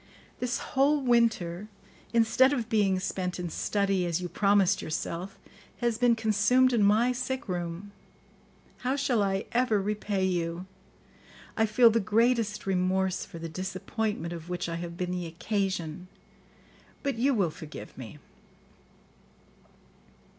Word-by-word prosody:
This 250 -1 -1 0.2
whole 280 +2 +4
winter, 220 -7 +1 0.4
instead 235 +4 +4
of 235 -5 -2
being 200 -4 +2
spent 185 -1 -3
in 175 -2 -4
study, 195 -1 0
as 170 0 0
you 180 - -4
promised 200 +1 +2
yourself, 170 +4 -4 0.4
has 235 -2 -1
been 245 -1 +4
consumed 225 +4 +3
in 230 - +3
my 215 +5 +4
sick 260 +1 -3
room. 175 +2 -4 0.9
How 255 +2 -1
shall 260 -5 +1
I 195 0 0
ever 235 -3 +2
repay 205 -1 -1
you? 175 -1 -2 0.9
I 220 0 +2
feel 230 +2 +6
the 230 - +2
greatest 220 0 +1
remorse 190 0 0
for 195 -4 -10
the 165 0 -5
disappointment 185 +1 -3
of 170 0 -8
which 180 -1 -3
I 165 0 -3
have 170 0 -6
been 180 0 -2
the 180 -1 -3
occasion, 180 -2 -3 1.0
but 275 -5 -2
you 270 +2 +3
will 190 -7 +1
forgive 155 -1 -10
me." 130 +1 -9
200 Hz, 135 wpm, -28 LUFS, 180-230 Hz, 1.0 s, feel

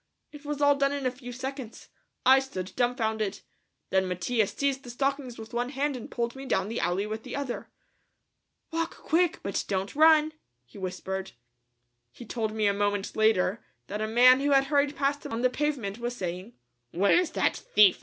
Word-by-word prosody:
It 295 -1 -12
was 290 0 -2
all 285 0 +6
done 275 0 +1
in 280 -2 -3
a 255 - +2
few 250 -1 -9
seconds. 260 -1 -7 0.4
I 265 +1 +8
stood 190 -9 -5
dumbfounded. 220 -5 0 0.5
Then 190 0 +2
Mattia 195 +5 0
seized 275 +3 -1
the 245 - -10
stockings 270 0 -2
with 225 +1 -10
one 245 +1 -1
hand 285 +1 -1
and 245 - -8
pulled 235 0 -2
me 270 0 -8
down 190 -3 0
the 230 - -3
alley 175 +4 0
with 215 +1 -4
the - - -7
other. 275 -3 -4 1.0
"Walk 330 +1 -2
quick, 340 +1 +1
but 200 - -1
don't 195 +3 -2
run," 310 0 +5 0.3
he 120 - -13
whispered. 190 +1 -4 0.8
He 235 - -11
told 220 -1 -2
me 215 -1 -1
a 200 - +4
moment 205 0 -1
later 215 -1 +2 0.2
that 210 +1 -5
a 215 - 0
man 250 +3 +6
who 285 +1 0
had 275 -1 +5
hurried 285 +1 +1
past 285 0 0
him - - -6
on 230 +2 -2
the 255 - +3
pavement 255 -8 -2
was 240 +1 -3
saying, 185 +3 -5 0.4
"Where's 200 - +3
that - - +1
thief? 205 -3 +4
240 Hz, 190 wpm, -28 LUFS, 205-275 Hz, 1.0 s, I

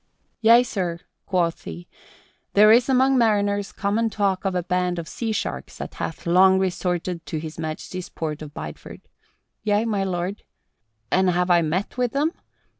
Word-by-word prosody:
"Yea, 230 +2 +7
sir," 185 -8 -3 0.3
quoth 175 -4 0
he, 85 +1 -8 0.7
"there 210 +1 +7
is 240 +3 +5
among 265 0 +4
mariners 205 -3 +1
common 215 +3 0
talk 195 -2 -1
of 190 -1 0
a 180 - 0
band 180 0 0
of 165 -1 -5
sea 230 -2 -3
sharks 215 - -4
that - - -6
hath 165 - -5
long 190 +2 +5
resorted 180 -2 -1
to 160 - -3
His 155 +1 -7
Majesty's 165 +3 -5
port 155 -2 -4
of 150 -1 -8
Bideford. - - -8 0.6
Yea, 210 +1 +1
my 205 -4 0
lord. 185 +1 -3 0.7
And 190 0 +3
have 180 0 +1
I 175 -1 +5
met 180 +9 -2
with 245 -2 0
them? 295 +4 +1
190 Hz, 165 wpm, -23 LUFS, 175-215 Hz, 0.7 s, Yea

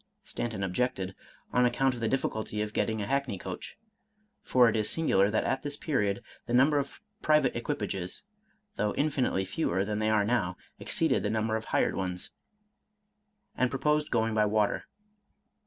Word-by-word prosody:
Stanton 110 -5 -3
objected, 95 -1 -1 0.4
on 125 - +4
account 130 +2 +2
of 120 - -7
the 115 - 0
difficulty 110 -4 -1
of 105 0 -6
getting 110 -1 0
a - - -2
hackney 135 -4 -1
coach 90 - -7 0.6
(for 125 -2 +5
it 115 - +2
is 105 -1 +1
singular 100 -12 +3
that 110 - +1
at 135 - 0
this 145 0 -4
period 105 -10 0 0.2
the 120 - +1
num 135 +5 +6
ber 145 - +3
of 140 - -5 0.2
private 150 -4 +3
equipages, 100 -6 -3 0.5
though 105 -1 0
infinitely 140 -9 +1
fewer 95 - 0
than 105 0 -2
they 110 0 +1
are 105 -2 +3
now, 100 -6 0 0.2
exceeded - - +1
the 105 - -1
number 110 0 0
of 110 0 -3
hired - - +1
ones), 90 -1 -3 1.2
and 130 - +2
proposed 150 +3 +1
going 115 -1 +1
by 110 -1 +3
water. 105 0 +1
110 Hz, 170 wpm, -29 LUFS, 100-130 Hz, 1.2 s, num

